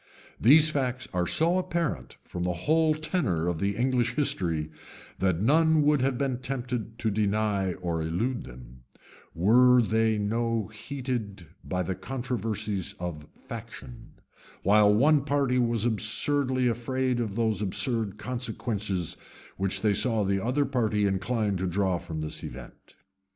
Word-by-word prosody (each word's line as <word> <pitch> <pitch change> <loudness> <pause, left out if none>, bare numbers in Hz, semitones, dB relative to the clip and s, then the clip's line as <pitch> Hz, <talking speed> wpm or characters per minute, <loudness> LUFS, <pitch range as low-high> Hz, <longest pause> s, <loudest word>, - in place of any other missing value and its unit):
[] - - -24
These 155 +2 +8
facts 130 -3 -2
are 90 -1 0
so 170 +3 +2
apparent 170 - -3
from 90 - -7
the 90 0 0
whole 160 0 +3
tenor 145 - -1
of 85 -2 -1
the 100 0 0
English 125 -1 0
history, 85 - 0 0.5
that 95 -1 +1
none 160 +4 +4
would 145 -2 +3
have 130 -1 0
been 130 -2 -1
tempted 125 -3 -4
to 110 -2 -1
deny 100 -2 0
or 85 -3 -3
elude 105 +11 -2
them, 60 0 -13 0.5
were 125 +8 +5
they 110 -1 +2
no 115 +1 -1
heated 110 -5 -5 0.2
by 90 -1 -2
the 95 - -2
controversies 105 -2 -3
of 80 -4 -6
faction; 115 +1 -10 0.5
while 105 +1 +5
one 140 +7 +4
party 140 -3 +1
was 115 -2 +1
absurdly 125 +4 +1
afraid 125 +2 -1
of 110 -4 -3
those 110 -2 0
absurd 105 +1 0
consequences 110 -7 -3 0.4
which 95 0 0
they 105 -2 +2
saw 115 +1 +2
the 95 0 0
other 130 +5 +1
party 110 -6 0
inclined 100 +1 0
to 95 - -1
draw 95 -1 0
from 80 -3 -6
this 75 - -5
event. - - -11
110 Hz, 145 wpm, -27 LUFS, 95-130 Hz, 0.5 s, These